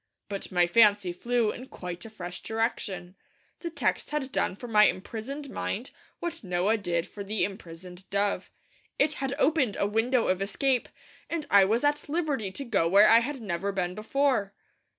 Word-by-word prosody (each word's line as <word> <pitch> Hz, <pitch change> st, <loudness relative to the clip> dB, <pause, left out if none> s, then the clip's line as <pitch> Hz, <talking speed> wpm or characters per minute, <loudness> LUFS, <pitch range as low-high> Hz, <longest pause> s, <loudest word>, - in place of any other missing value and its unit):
But 200 Hz, 0 st, -5 dB
my 175 Hz, -1 st, +4 dB
fancy 205 Hz, -1 st, +4 dB
flew 235 Hz, +3 st, +1 dB
in 255 Hz, -, -9 dB
quite 180 Hz, -5 st, -7 dB
a -, -, -8 dB
fresh 180 Hz, -4 st, -7 dB
direction. 200 Hz, -5 st, -3 dB, 0.4 s
The 340 Hz, -, -4 dB
text 330 Hz, -, -1 dB
had 295 Hz, -3 st, -2 dB
done 185 Hz, -, 0 dB
for 245 Hz, -, -8 dB
my 210 Hz, -2 st, +6 dB
imprisoned 260 Hz, +10 st, -3 dB
mind 240 Hz, +2 st, -3 dB, 0.3 s
what 335 Hz, -4 st, -5 dB
Noah 185 Hz, +4 st, +1 dB
did 170 Hz, -4 st, -1 dB
for 205 Hz, -, -8 dB
the 210 Hz, +1 st, -1 dB
imprisoned 180 Hz, -1 st, -7 dB
dove. 200 Hz, 0 st, 0 dB, 0.5 s
It 300 Hz, +2 st, +3 dB
had 270 Hz, 0 st, -1 dB
opened 285 Hz, -9 st, +2 dB
a -, -, +2 dB
window 225 Hz, +4 st, +1 dB
of 185 Hz, +1 st, +1 dB
escape, 255 Hz, +5 st, 0 dB, 0.4 s
and 330 Hz, -3 st, -2 dB
I 200 Hz, -1 st, +7 dB
was 225 Hz, +6 st, +1 dB
at 290 Hz, 0 st, +1 dB
liberty 290 Hz, -, -1 dB
to 275 Hz, +8 st, -6 dB
go 200 Hz, -9 st, +2 dB
where 200 Hz, +4 st, +7 dB
I 230 Hz, -, +8 dB
had 265 Hz, +2 st, -4 dB
never 195 Hz, -1 st, -2 dB
been 180 Hz, -2 st, -2 dB
before. 220 Hz, -1 st, 0 dB
215 Hz, 175 wpm, -28 LUFS, 190-260 Hz, 0.5 s, I